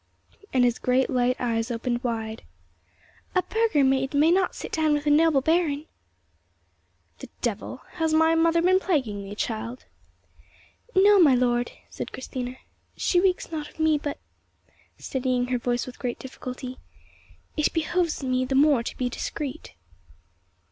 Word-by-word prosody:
and 255 Hz, -1 st, +3 dB
his 245 Hz, -1 st, +2 dB
great 255 Hz, +1 st, +1 dB
light 250 Hz, 0 st, +2 dB
eyes 230 Hz, -1 st, -1 dB
opened 240 Hz, +1 st, -2 dB
wide. 225 Hz, -2 st, -3 dB, 0.9 s
"A 365 Hz, -, +3 dB
burgher 440 Hz, -10 st, +2 dB
maid 265 Hz, +1 st, +1 dB
may 305 Hz, +3 st, +5 dB
not 370 Hz, +1 st, +2 dB
sit -, -, -7 dB
down 310 Hz, -2 st, +2 dB
with 295 Hz, 0 st, -1 dB
a 295 Hz, -, +3 dB
noble 305 Hz, -2 st, +4 dB
baron." 315 Hz, -1 st, +1 dB, 1.3 s
"The -, -, -9 dB
devil! 235 Hz, +3 st, -3 dB, 0.2 s
Has 320 Hz, -1 st, +1 dB
my 320 Hz, +1 st, +4 dB
mother 335 Hz, +1 st, +3 dB
been 370 Hz, +1 st, +4 dB
plaguing 255 Hz, -, -1 dB
thee, 200 Hz, +1 st, -8 dB
child?" 230 Hz, +3 st, -4 dB, 1.1 s
"No, 400 Hz, +1 st, +6 dB
my 295 Hz, -7 st, +6 dB
lord," 245 Hz, -1 st, +1 dB, 0.2 s
said -, -, -6 dB
Christina, 255 Hz, -1 st, -5 dB, 0.4 s
"she 355 Hz, -, +2 dB
reeks 365 Hz, -2 st, +1 dB
not 305 Hz, -2 st, -4 dB
of -, -, -22 dB
me; 315 Hz, -1 st, +3 dB
but"—steadying 260 Hz, -3 st, -5 dB
her 250 Hz, -1 st, 0 dB
voice 240 Hz, 0 st, -1 dB
with 255 Hz, -, -10 dB
great 245 Hz, -2 st, -3 dB
difficulty—"it 255 Hz, +3 st, -7 dB
behoves 335 Hz, -1 st, -1 dB
me 255 Hz, -1 st, +1 dB
the 265 Hz, +1 st, -2 dB
more 280 Hz, -2 st, +5 dB
to 235 Hz, -, -6 dB
be 250 Hz, -, 0 dB
discreet." 285 Hz, +3 st, -5 dB
265 Hz, 145 wpm, -25 LUFS, 245-320 Hz, 1.3 s, No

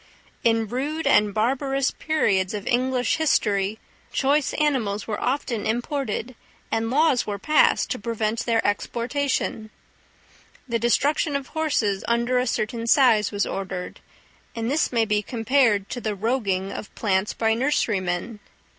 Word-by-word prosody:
In 225 Hz, -1 st, +2 dB
rude 285 Hz, +8 st, -3 dB
and 210 Hz, -6 st, +4 dB
barbarous 270 Hz, +5 st, 0 dB
periods 200 Hz, -11 st, 0 dB
of 205 Hz, -, -5 dB
English 250 Hz, 0 st, +1 dB
history 210 Hz, -9 st, +1 dB, 0.3 s
choice 280 Hz, +1 st, +1 dB
animals 245 Hz, -9 st, 0 dB
were 210 Hz, -2 st, -4 dB
often 250 Hz, -4 st, -1 dB
imported, 245 Hz, +1 st, -2 dB, 0.4 s
and 225 Hz, 0 st, 0 dB
laws 280 Hz, -1 st, +2 dB
were 205 Hz, -1 st, -2 dB
passed 305 Hz, +9 st, +3 dB
to 255 Hz, -, -2 dB
prevent 220 Hz, +1 st, -2 dB
their 230 Hz, -1 st, +1 dB
exportation: 235 Hz, +1 st, -1 dB, 1.0 s
the 230 Hz, -2 st, -1 dB
destruction 285 Hz, +6 st, +1 dB
of 280 Hz, -1 st, -3 dB
horses 265 Hz, -11 st, 0 dB
under 235 Hz, +2 st, +1 dB
a 250 Hz, -, 0 dB
certain 230 Hz, +1 st, -2 dB
size 230 Hz, -, +4 dB
was 205 Hz, 0 st, 0 dB
ordered, 185 Hz, -2 st, -5 dB, 0.6 s
and 230 Hz, +2 st, -2 dB
this 305 Hz, -, +1 dB
may 230 Hz, -2 st, +2 dB
be 210 Hz, -1 st, +1 dB
compared 225 Hz, -2 st, +1 dB
to 245 Hz, -, -4 dB
the 215 Hz, -1 st, -2 dB
"roguing" 200 Hz, -3 st, -1 dB
of -, -, -7 dB
plants 195 Hz, -1 st, 0 dB
by 225 Hz, -1 st, +2 dB
nurserymen. 210 Hz, -5 st, -1 dB
230 Hz, 135 wpm, -24 LUFS, 210-265 Hz, 1.0 s, and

